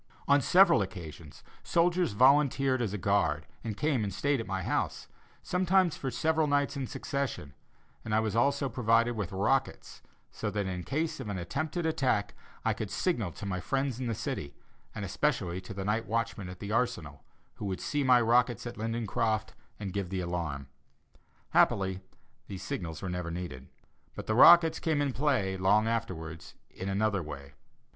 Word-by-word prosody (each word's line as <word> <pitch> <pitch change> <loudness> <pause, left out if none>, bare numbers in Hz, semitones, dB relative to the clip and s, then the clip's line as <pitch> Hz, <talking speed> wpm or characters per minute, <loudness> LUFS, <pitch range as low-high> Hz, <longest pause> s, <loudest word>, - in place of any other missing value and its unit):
On 140 0 +5
several 175 - +6
occasions, 85 -5 -8 0.2
soldiers 175 - +1
volunteered 135 +1 +4
as 110 -5 -1
a 105 - -3
guard 90 -6 +1 0.2
and 110 -3 -4
came 145 -7 +1
and 100 - -2
stayed 140 +9 0
at 115 - -5
my 95 -2 -2
house, - - -2 0.4
sometimes 185 -1 +2
for 135 - -4
several 155 +5 +1
nights 145 0 +1
in 135 -2 -3
succession, 130 - -4 0.5
and 110 -1 -1
I - - +4
was 110 -1 -1
also 140 +3 +2
provided 115 -1 +2
with 105 -5 -3
rockets, 115 +8 -1 0.3
so - - -3
that 105 -1 -2
in 90 -2 -4
case 155 +2 -2
of 105 - -5
an 100 - -3
attempted 155 - -3
attack 125 -10 0 0.3
I - - +3
could 110 - -5
signal 115 - -1
to - - -8
my 95 -2 -2
friends 135 +3 -1
in 130 - -3
the 115 - -1
city 70 -6 -4 0.4
and 105 -2 -4
especially 95 -6 -1
to 95 - -10
the 95 -1 -4
night 110 +2 0
watchman 115 -4 -2
at 90 - -8
the 100 +3 -6
arsenal, 90 -11 -1 0.3
who - - -5
would 95 -2 -3
see 145 -1 -1
my 125 -2 +6
rockets 120 0 +2
at 120 - -6
Lindencroft 110 -1 -1 0.3
and 100 -3 -5
give 100 -3 -2
the 95 -1 -2
alarm. 85 -6 -3 0.8
Happily 95 -1 +2 0.5
these 95 -1 -7
signals 80 -2 -5
were - - -3
never 90 -1 -3
needed, 85 -7 -6 0.5
but - - -6
the 110 - 0
rockets 165 +6 +7
came 160 -3 0
in 140 -2 0
play, 125 -10 0
long 100 +4 +3
afterwards, 90 -8 -4 0.2
in 95 - -5
another 100 0 +1
way. 70 -3 -9
110 Hz, 175 wpm, -30 LUFS, 95-135 Hz, 0.8 s, rockets